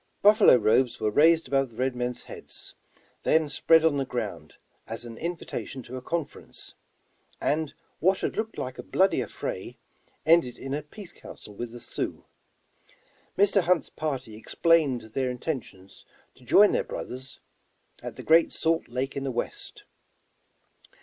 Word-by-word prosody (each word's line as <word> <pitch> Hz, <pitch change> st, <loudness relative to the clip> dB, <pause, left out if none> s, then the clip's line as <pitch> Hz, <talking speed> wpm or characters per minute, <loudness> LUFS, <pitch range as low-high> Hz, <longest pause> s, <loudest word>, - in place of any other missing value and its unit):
Buffalo 210 Hz, -, +7 dB
robes 120 Hz, +2 st, +2 dB
were 110 Hz, -1 st, 0 dB
raised 160 Hz, +5 st, +4 dB
above 135 Hz, 0 st, +1 dB
the 115 Hz, -, -19 dB
red 130 Hz, 0 st, 0 dB
men's 125 Hz, 0 st, -3 dB
heads, -, -, -11 dB, 0.5 s
then 160 Hz, -1 st, +3 dB
spread 160 Hz, +2 st, +4 dB
on 150 Hz, -3 st, +3 dB
the 135 Hz, -, +1 dB
ground 125 Hz, -2 st, -5 dB, 0.3 s
as 115 Hz, +2 st, -6 dB
an 115 Hz, -1 st, -8 dB
invitation 160 Hz, -4 st, -5 dB
to 125 Hz, -, -9 dB
a 130 Hz, -, -5 dB
con 165 Hz, +4 st, -1 dB
ference, -, -, -13 dB, 0.7 s
and 155 Hz, 0 st, -1 dB, 0.2 s
what 190 Hz, +4 st, +2 dB
had -, -, -2 dB
looked 220 Hz, 0 st, -3 dB
like 130 Hz, 0 st, -5 dB
a -, -, -2 dB
bloody 190 Hz, -7 st, +2 dB
affray 115 Hz, -, -5 dB, 0.5 s
end 165 Hz, +2 st, +6 dB
ed 125 Hz, -1 st, -9 dB
in 135 Hz, 0 st, -5 dB
a 150 Hz, -, -1 dB
peace 175 Hz, +4 st, -12 dB
council 105 Hz, -, -12 dB
with 120 Hz, +4 st, -5 dB
the 120 Hz, -, -9 dB
Sioux. -, -, -5 dB, 1.1 s
Mr. 200 Hz, 0 st, +4 dB
Hunt's 180 Hz, -1 st, +1 dB
party 135 Hz, -8 st, -4 dB
explained 145 Hz, +2 st, +2 dB
their 130 Hz, 0 st, 0 dB
intentions 125 Hz, -, -6 dB, 0.3 s
to 125 Hz, -, -21 dB
join 205 Hz, -, +6 dB
their -, -, +1 dB
brothers, 130 Hz, +1 st, -8 dB, 0.6 s
at 120 Hz, -2 st, -7 dB
the 130 Hz, -, -9 dB
great 165 Hz, +3 st, +5 dB
salt 165 Hz, 0 st, 0 dB
lake 130 Hz, +3 st, -3 dB
in 140 Hz, -, -3 dB
the 135 Hz, -, -2 dB
west. 120 Hz, -2 st, -5 dB
135 Hz, 160 wpm, -27 LUFS, 125-165 Hz, 1.1 s, Buffalo